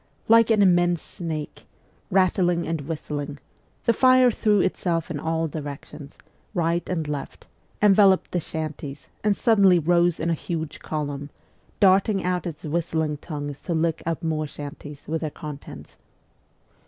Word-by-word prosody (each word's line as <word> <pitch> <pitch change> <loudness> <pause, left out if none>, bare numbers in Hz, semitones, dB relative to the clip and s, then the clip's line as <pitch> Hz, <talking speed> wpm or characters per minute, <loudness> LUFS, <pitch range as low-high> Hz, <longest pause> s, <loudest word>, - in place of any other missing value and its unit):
Like 230 0 +6
an 215 -2 +4
immense 175 -2 +3
snake, 160 -4 -6 0.4
rattling 180 -2 +2
and 165 -2 -2
whistling, 145 -1 -5 0.5
the 235 - +4
fire 255 0 +5
threw 210 -2 +2
itself 170 -3 0
in 150 - -3
all 160 +1 -1
directions, 145 -1 -8 0.4
right 170 0 +1
and 165 -4 -2
left, 145 -2 -6 0.4
enveloped 195 -2 +5
the 180 - 0
shanties, 155 -3 -6
and 205 -1 +2
suddenly 200 -6 +5
rose 175 +1 +2
in 165 +1 0
a - - +3
huge 160 -1 -4
column, 145 -2 -4 0.5
darting 195 +1 +4
out 180 0 -1
its 160 -3 -7
whistling 160 -1 -1
tongues 145 -2 -6
to 170 - -2
lick 165 0 0
up 165 +1 -3
more 155 -1 -1
shanties 145 0 -9
with 160 +1 -2
their 155 - -2
contents. 150 -2 -10
165 Hz, 140 wpm, -24 LUFS, 150-185 Hz, 0.5 s, Like